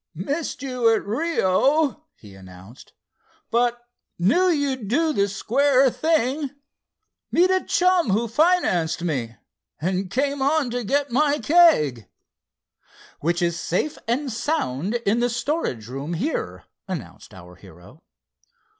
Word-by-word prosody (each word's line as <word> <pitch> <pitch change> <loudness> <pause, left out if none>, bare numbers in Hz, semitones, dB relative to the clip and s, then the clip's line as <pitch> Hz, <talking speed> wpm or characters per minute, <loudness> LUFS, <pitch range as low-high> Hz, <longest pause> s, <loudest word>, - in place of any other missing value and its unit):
"Missed 280 - -4
you 250 -4 +1
at - - -4
Rio," 290 - +1
he 105 -3 -15
announced; 95 +4 -15 0.6
"but 240 +1 +1 0.3
knew 290 - +3
you'd 275 - -1
do 310 +8 +1
the 200 -5 +1
square 260 +6 +2
thing. 300 -2 0 0.8
Met 365 +2 +3
a 375 -1 +1
chum 360 - +2
who 220 +5 +1
financed 230 - +1
me, 125 -9 -3 0.4
and 185 +3 -2
came 275 +5 -1
on 280 -2 +1
to 245 0 -3
get 275 +4 0
my 290 +3 +2
keg." 285 - +3 1.1
"Which 175 +3 0
is 170 -1 -1
safe 290 - -2
and 260 +3 -1
sound 220 - -2
in 215 +4 +2
the 245 0 +1
storage 235 - -2
room 135 +6 -5
here," 280 - -3 0.2
announced 130 - -7
our 90 -1 -13
hero. 95 - -16
240 Hz, 125 wpm, -23 LUFS, -, 1.1 s, knew